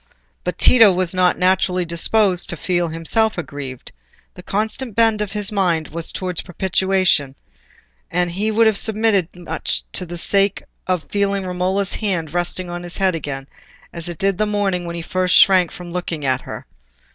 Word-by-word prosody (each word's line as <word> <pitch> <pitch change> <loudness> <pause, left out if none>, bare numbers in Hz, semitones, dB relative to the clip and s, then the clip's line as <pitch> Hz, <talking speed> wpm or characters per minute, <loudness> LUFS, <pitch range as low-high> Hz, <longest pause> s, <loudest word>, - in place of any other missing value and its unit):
But - - -3
Tito 225 -5 +7
was 185 -1 0
not 180 -1 +2
naturally 185 -1 +1
disposed 180 +3 +2
to 175 - -3
feel 175 +1 0
himself 175 +7 0
aggrieved; 140 -6 -7 0.4
the 180 - -11
constant 215 +4 -3
bent 225 -2 +3
of 210 -1 -3
his 210 -1 0
mind 175 -6 0
was 165 +2 -4
towards 180 -2 -3
propitiation, 185 -5 +1 0.7
and 175 0 0
he 205 +5 -1
would 225 +1 +3
have 220 -2 +3
submitted 215 -5 +1
to 180 - -14
much 165 -2 -3
for 180 - 0
the 175 0 -7
sake 195 +3 +1 0.2
of 180 -3 0
feeling 200 -1 0
Romola's 185 +2 -1
hand 175 -8 -2
resting 175 +1 -2
on 175 0 -5
his 175 0 -7
head 190 -2 +2
again, 140 -4 -5 0.5
as 170 0 -5
it 170 - -6
did 195 +1 0
that 215 - +2
morning 195 -4 -1
when 170 - -5
he 170 - -5
first 185 +1 0
shrank 185 -3 +6
from 175 -1 -9
looking 170 -4 -4
at 130 -1 +1
her. - - -8
180 Hz, 180 wpm, -20 LUFS, 170-200 Hz, 0.7 s, Tito